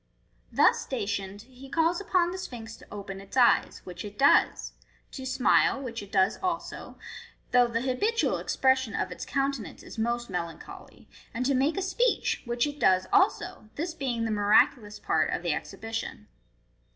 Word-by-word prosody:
Thus - - +4
stationed, 200 -4 -4
he 260 +2 -14
calls 330 +5 +1
upon 360 -3 +1
the 375 - -5
Sphinx 225 -9 -7
to - - -17
open 195 -1 -7
its 195 +6 -9
eyes, 245 -2 +4
which 180 -1 -8
it 205 -1 -9
does 280 - +3 0.2
* - - -36
to 265 -2 -6
smile, 260 +1 +3
which 240 -4 -5
it 200 -1 -11
does 190 0 +2
also, 360 -3 -4 0.5
though 245 -1 +5
the 235 -1 -2
habitual 340 - 0
expression 260 -4 +1
of - - -2
its - - -6
countenance 275 -3 -2
is - - -9
most 240 +1 -1
melancholy, 170 -2 -7 0.3
and 250 +2 -1
to 275 - +2
make 275 +4 +1
a 390 - 0
speech, 475 +6 +1
which 240 0 0
it 290 0 -5
does 185 0 +4
also, 380 - +1
this 330 +2 -3
being 245 -7 -2
the 225 - -1
miraculous 210 +1 +3
part - - +1
of - - -2
the - - +1
exhibition. 225 - -6
245 Hz, 170 wpm, -28 LUFS, 210-275 Hz, 0.5 s, though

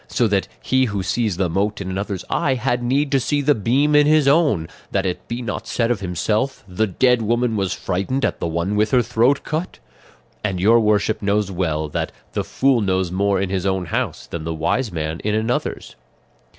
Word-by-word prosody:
So 120 - +1
that 100 -1 +1
he 130 - +2
'who 105 -5 -2
sees 105 -1 -1
the 95 -1 +1
mote 100 +5 -1
in 100 - -5
another's 95 0 -4
eye 135 - +1
had 120 0 -1
need 135 +4 0
to 135 - +3
see 145 +3 0
the 145 +1 +3
beam 135 +7 +1
in 150 0 +6
his 155 -2 +4
own,' 140 - +3 0.2
that 95 -1 0
it 90 -1 -3
be 120 +1 -4
not 110 - -4
said 115 0 0
of 120 - 0
himself, 105 +8 -1
'the 105 +4 0
dead 125 +5 +2
woman 120 +1 +1
was 95 -3 -1
frightened 100 +10 -1
at - - -2
the - - -2
one 85 +5 -1
with 105 +1 +2
her 125 0 +3
throat 125 +6 +2
cut;' 160 +4 -3 0.7
and 95 -4 -1
your 110 +5 +5
worship 105 0 +1
knows 100 -1 0
well 80 -4 -1
that 75 - -3 0.2
'the - - -1
fool 130 -3 +2
knows 95 -3 0
more 100 +1 +1
in 95 -1 -2
his 95 0 -1
own 95 -1 0
house 80 - -3
than 85 -2 -6
the 80 0 -3
wise 105 +9 0
man 80 -1 -3
in 105 0 -1
another's. 110 +3 -2
105 Hz, 210 wpm, -21 LUFS, 95-125 Hz, 0.7 s, in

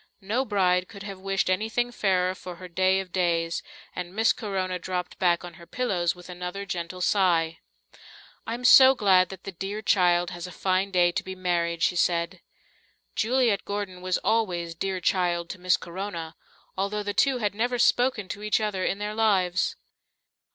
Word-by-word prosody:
No 225 +7 -1
bride 185 -4 +2
could 200 -1 -11
have 195 -2 -7
wished 195 0 -1
anything 220 +6 0
fairer 185 -4 +1
for 180 -1 -9
her 185 +1 -10
day 185 +2 +2
of 190 -2 -6
days, 170 -2 0 0.3
and 180 +1 -6
Miss 225 +1 +3
Corona 190 -3 -3
dropped 180 0 -4
back 175 -1 +2
on 175 - -9
her 170 - -13
pillows 185 -10 -1
with 180 0 -13
another 180 +2 -6
gentle 180 -1 -5
sigh. 170 -4 +2 0.9
"I'm 235 +2 -4
so 265 +1 +9
glad 185 -5 +4
that 190 -1 -10
the 195 - -6
dear 195 +4 -5
child 175 -3 +3
has 175 +1 -6
a - - -9
fine 185 +2 0
day 175 -2 +3
to - - -2
be 190 0 -7
married," 170 -2 -1
she 180 - +2
said. 170 +1 0 0.7
Juliet 235 -3 +2
Gordon 200 -3 -5
was 185 0 0
always 180 -7 0
"dear 185 +2 -3
child" 175 -1 0
to 185 - -9
Miss 180 0 +3
Corona, 170 -2 -6 0.4
although 200 +2 -2
the 205 0 -3
two 270 +2 +3
had 210 -4 -1
never 245 +4 -1
spoken 245 -4 +2
to 205 - -6
each 210 0 +1
other 210 -4 -2
in 195 - 0
their 210 +1 -4
lives. 190 -5 +1
185 Hz, 180 wpm, -26 LUFS, 180-205 Hz, 0.9 s, so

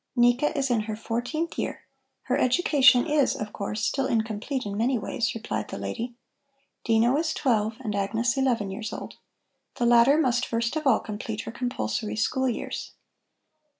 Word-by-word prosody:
"Nika 245 +5 +3
is 270 -2 0
in 235 - +3
her 215 - -2
fourteenth 245 +9 -3
year. - - -3 0.4
Her - - 0
education 260 -2 +4
is, 300 -3 +2
of 210 0 -6
course, 210 +2 -4
still 265 +6 0
incomplete 225 +4 -2
in 200 -1 -4
many 240 +4 +1
ways," 230 +1 -2
replied 230 - -3
the - - -6
lady. 240 +1 -4 0.7
"Dino 230 +3 +3
is 315 0 -1
twelve 220 -5 +1
and 215 -5 -3
Agnes 225 +5 0
eleven 240 -7 0
years 220 +2 -5
old. - - -7 0.6
The 240 - 0
latter 240 +4 +6
must 250 -5 +2
first 235 +3 -1
of 310 -2 -1
all 250 - +4
complete 215 +1 -5
her - - -7
compulsory 215 - -3
school 260 +4 +1
years." 235 - -5
235 Hz, 165 wpm, -26 LUFS, 220-265 Hz, 0.7 s, latter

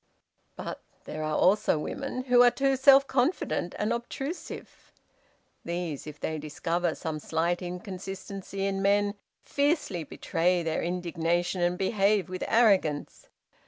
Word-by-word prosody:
' - - -46
"But - - -6 0.2
there 155 - -6
are 155 0 -1
also 195 -3 +3
women, 255 - -4
who 250 -1 +5
are 245 - +8
too 270 +2 +1
self 275 +1 +7
confident 260 - 0
and 215 +3 0
obtrusive. 270 +7 -6 0.7
These, 170 -4 -4
if 150 0 -9
they 155 -1 -3
discover 165 +3 -1
some 155 -2 -4
slight 170 +4 -1
inconsistency 195 +1 -6
in 195 0 -1
men, 205 +1 +3 0.3
fiercely 285 - 0
betray 175 +4 0
their 160 -1 -1
indignation 175 0 -1
and 175 +1 +1
behave 200 0 +2
with 185 0 -4
arrogance. 195 -10 +2
185 Hz, 130 wpm, -28 LUFS, 170-230 Hz, 0.7 s, are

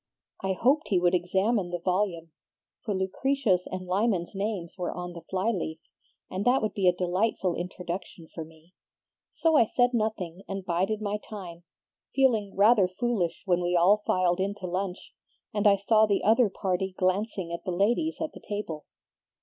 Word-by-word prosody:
"I 190 0 +1
hoped 270 - +2
he 195 - +2
would 175 0 +3
examine 190 +3 +1
the 175 - -2
volume, 180 -2 -1 0.5
for 210 -3 -2
Lucretia's 190 0 0
and 185 0 -5
Lyman's 185 -1 0
names 195 -4 -3
were 180 -2 -3
on 180 0 -6
the 170 - -9
fly 190 +6 -1
leaf, 165 -6 -3 0.5
and 185 +2 -3
that 245 +1 +3
would 215 - -1
be 195 -2 +1
a - - +8
delightful 180 +1 0
introduction 175 -1 -6
for 165 - -5
me. 160 +2 -18 0.6
So 325 -2 +1
I 235 - +6
said 245 +3 +2
nothing 205 -6 -2
and 195 -1 -5
bided 190 +5 0
my 205 0 -1
time, 175 -5 -8 0.5
feeling 225 -7 +2
rather 205 -1 +5
foolish 185 -4 -2
when 180 -2 +2
we 175 0 0
all 190 +5 +5
filed 180 -1 +2
in 200 +2 -1
to 190 - -8
lunch, 180 +1 -4 0.4
and 210 0 +2
I 200 - +7
saw 215 +2 +3
the 200 -1 +1
other 225 +1 +4
party 190 -1 -2
glancing 185 -1 0
at 170 - -5
the 190 - -4
ladies 235 - +1
at 315 - -2
the - - -12
table. 205 -7 -5
190 Hz, 175 wpm, -27 LUFS, 180-215 Hz, 0.6 s, a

